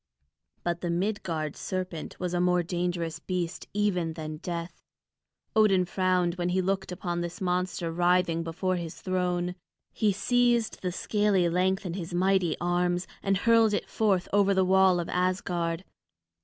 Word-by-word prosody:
But 170 0 -2
the 175 - -2
Midgard 170 -4 -2
serpent 185 -4 -5
was 180 -1 -2
a 175 - +1
more 180 0 +3
dangerous 175 -1 -2
beast 180 -3 -3
even 185 -5 0
than 155 -1 -6
Death. 170 +1 -5 0.7
Odin 195 -4 +4
frowned 180 -1 +1
when 175 0 0
he 185 +1 +1
looked 190 0 -1
upon 175 -1 -3
this 175 0 -5
monster 180 -2 -1
writhing 175 0 +2
before 175 +3 -1
his 170 -2 -6
throne. 180 -1 -1 0.4
He 215 -2 +2
seized 240 +2 +1
the 180 - -1
scaly 205 -1 +1
length 190 +3 +1
in 175 - -3
his 175 -1 -5
mighty 185 -1 +2
arms 175 0 0 0.2
and 195 -1 +1
hurled 225 0 +4
it - - -3
forth 195 -5 +1
over 200 -1 +4
the 190 0 +3
wall 190 -1 +4
of 170 - -3
Asgard. 180 -2 -1
180 Hz, 155 wpm, -28 LUFS, 175-190 Hz, 0.7 s, Odin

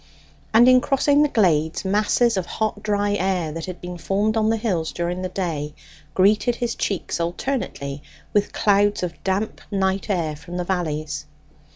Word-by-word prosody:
And 235 +3 +6
in 255 0 +7
crossing 285 +2 +3
the 300 - +3
glades, 165 - +2
masses 210 +4 +2
of 185 -2 -2
hot 215 -1 -2
dry 205 -1 0
air, 185 -5 0
that 165 +2 -6
had 180 -1 -6
been 180 -1 -7
formed 205 +5 0
on 220 -1 +2
the 225 - +2
hills 185 -8 -1
during 175 +1 -3
the 185 - -3
day, 155 -6 -3 0.4
greeted 210 +5 +3
his 235 -1 -2
cheeks 195 -4 -2
alternately 170 - -3 0.3
with 205 0 +2
clouds 205 -2 +2
of 170 -2 -5
damp 195 +3 -1
night 195 0 0
air 165 -6 0
from 170 +4 -8
the 180 - -1
valleys. 155 -4 -2
190 Hz, 170 wpm, -23 LUFS, 170-215 Hz, 0.4 s, in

